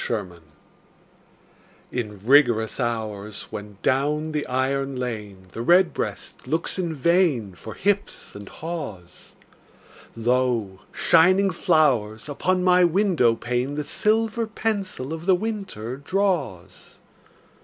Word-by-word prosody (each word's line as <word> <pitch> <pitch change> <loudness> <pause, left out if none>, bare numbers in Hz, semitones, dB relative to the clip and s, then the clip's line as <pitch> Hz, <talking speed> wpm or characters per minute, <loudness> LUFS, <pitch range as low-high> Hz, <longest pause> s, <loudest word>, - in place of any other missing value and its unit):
XVII—WINTER 95 -7 -4 1.5
In 105 -5 -5
rigorous 120 -5 +4
hours, 110 -3 -3
when 105 -1 -8
down 150 +4 +1
the 150 -1 -2
iron 135 +1 -1
lane 105 -7 -5
The 115 - -6
redbreast 175 -2 +1
looks 160 +6 -1
in 170 -3 -2
vain 150 - +2
For 110 +5 -10
hips 200 +1 -1
and 100 0 -10
haws, 110 - -8 0.8
Lo, 115 -4 0
shining 185 +4 +4
flowers 130 - +1
upon 180 +5 0
my 180 0 +5
window 170 - +3
pane 125 +4 -2
The 150 - -2
silver 225 +6 +1
pencil 200 -10 -3
of 165 +2 -7
the 190 - +6
winter 180 - -4
draws. 145 - -2
135 Hz, 110 wpm, -24 LUFS, 110-180 Hz, 1.5 s, the